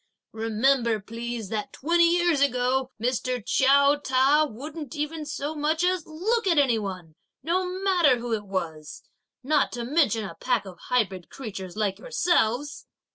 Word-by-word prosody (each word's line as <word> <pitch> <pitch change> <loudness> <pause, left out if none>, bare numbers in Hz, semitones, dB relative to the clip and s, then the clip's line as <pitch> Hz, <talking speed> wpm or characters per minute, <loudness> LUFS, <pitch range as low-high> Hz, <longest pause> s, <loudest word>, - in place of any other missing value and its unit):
Remember 225 +1 +1
please, 230 0 -6
that 215 -1 -4
twenty 340 +4 +3
years 345 -4 +2
ago, 255 -1 +1
Mr. 250 +1 -1
Chiao 280 +2 +4
Ta 285 +2 +3
wouldn't 290 +4 -8
even 300 +1 -4
so 290 +1 -4
much 310 +2 0
as 365 -2 0
look 400 +8 -1
at 340 -4 +3
any 255 -6 +3
one, 185 -6 -6 0.3
no 360 +4 0 0.2
matter 350 -9 +4
who 235 0 -4
it 210 -2 -3
was; 160 -5 -5 0.4
not 290 +1 +2
to 240 0 -4
mention 240 -5 +1
a 190 - -7
pack 240 +5 -1
of 185 -2 -11
hybrid 195 -8 0
creatures 195 -7 -7
like 205 -3 -1
yourselves!" 295 - 0
260 Hz, 150 wpm, -26 LUFS, 220-305 Hz, 0.4 s, Chiao